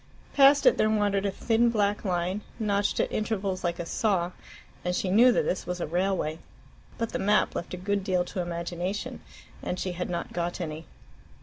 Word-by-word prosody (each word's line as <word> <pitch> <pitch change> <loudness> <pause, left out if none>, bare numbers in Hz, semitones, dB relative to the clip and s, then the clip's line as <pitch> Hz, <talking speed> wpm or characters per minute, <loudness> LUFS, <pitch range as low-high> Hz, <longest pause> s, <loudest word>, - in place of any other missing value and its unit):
Past 280 +1 +6
it - - +6
there 215 - +4
wandered 205 -2 +1
a - - -1
thin 230 +4 +2
black 205 -2 +1
line, 180 +1 -1 0.2
notched 205 -2 0
at - - +1
intervals 200 -4 -2
like 170 -1 -1
a 170 - -4
saw, 180 -2 0 0.5
and 180 0 -1
she 185 - -1
knew 240 +6 +7
that - - +2
this 185 - -2
was 180 0 -3
a - - -1
railway. 175 -1 -1 0.6
But 230 -1 -2
the - - -2
map 205 +2 +2
left 175 - -4
a - - -8
good 200 +2 -1
deal 180 -2 +1
to 180 - -4
imagination, 175 +3 -4 0.4
and 180 - -3
she 185 - -2
had 180 0 -4
not 170 -1 -4
got 175 0 -2
any. 160 -2 -5
190 Hz, 195 wpm, -27 LUFS, 175-210 Hz, 0.6 s, knew